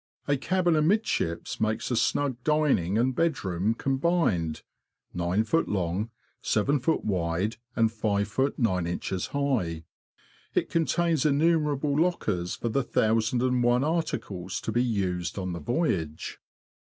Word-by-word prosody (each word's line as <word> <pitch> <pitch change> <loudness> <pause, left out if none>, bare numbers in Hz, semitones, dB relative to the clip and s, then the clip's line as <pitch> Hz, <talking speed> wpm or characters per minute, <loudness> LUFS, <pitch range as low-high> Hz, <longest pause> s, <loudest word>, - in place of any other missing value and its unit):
A 145 - +3
cabin 175 +4 +1
amidships 155 - 0
makes 110 +3 0
a - - +2
snug 135 +2 +1
dining 145 - +2
and 125 +3 +2
bedroom 110 - 0
combined, 135 - 0 0.5
9ft. 100 - +1
long, 95 +2 -1 0.3
7ft. 140 +8 +1
wide, 95 +2 -1 0.2
and 115 -2 +3
5ft. 110 +4 0
9in. 90 -3 -1
high. 115 - -1 0.7
It - - 0
contains 165 -1 +1
innumerable 150 -1 +2
lockers 100 - 0
for 120 - -3
the 140 +5 +1
thousand 115 0 +1
and 125 -1 +2
one 120 +2 +3
articles 115 - -2
to - - -3
be 120 +2 +2
used 90 -7 -1
on 95 -2 -3
the 85 - -4
voyage. 85 - -2
115 Hz, 120 wpm, -27 LUFS, 95-145 Hz, 0.7 s, A